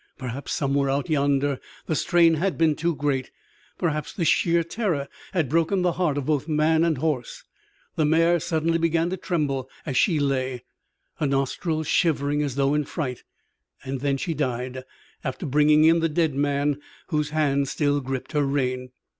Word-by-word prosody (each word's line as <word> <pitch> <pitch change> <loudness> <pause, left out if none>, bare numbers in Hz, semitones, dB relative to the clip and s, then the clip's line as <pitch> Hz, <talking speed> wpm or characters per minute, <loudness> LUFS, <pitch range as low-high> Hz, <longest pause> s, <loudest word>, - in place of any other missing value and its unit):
Perhaps 130 +2 -5
somewhere 140 -1 +1
out 140 +4 -1
yonder 140 -2 +1 0.3
the - - -1
strain 170 +2 +4
had 175 +4 0
been 160 -2 +3
too 170 +1 -1
great; 140 -3 -1 0.5
perhaps 155 -3 -1
the 170 - -2
sheer 170 +1 +3
terror 170 -6 -2 0.2
had 175 -7 0
broken 165 +6 +1
the 180 - +3
heart 165 -4 0
of 140 - -2
both 150 -1 0
man 160 +1 +3
and 165 -3 +1
horse. 140 -4 -2 0.5
The 155 - +3
mare 165 +3 +3
suddenly 165 +1 0
began 165 +1 +1
to 190 - -2
tremble 140 -8 -2 0.2
as 135 - -3
she 165 - +3
lay, 130 -3 -1 0.5
her 150 - 0
nostrils 145 +4 -1
shivering 145 -2 +1
as 140 -4 -2
though 140 0 +2
in 150 -1 +1
fright. 130 -7 -4 0.6
And 135 +1 -2
she 165 - -2
died, 130 -2 -3 0.4
after 130 +6 -4
bringing 150 +2 +4
in 165 +1 +5
the 165 0 +1
dead 160 -1 +1
man 145 +1 0 0.3
whose 150 -3 0
hand 140 -2 +1
still 145 +1 0
gripped 130 -1 -5
her 150 -2 +1
rein. 130 -2 -1
150 Hz, 170 wpm, -24 LUFS, 140-165 Hz, 0.6 s, in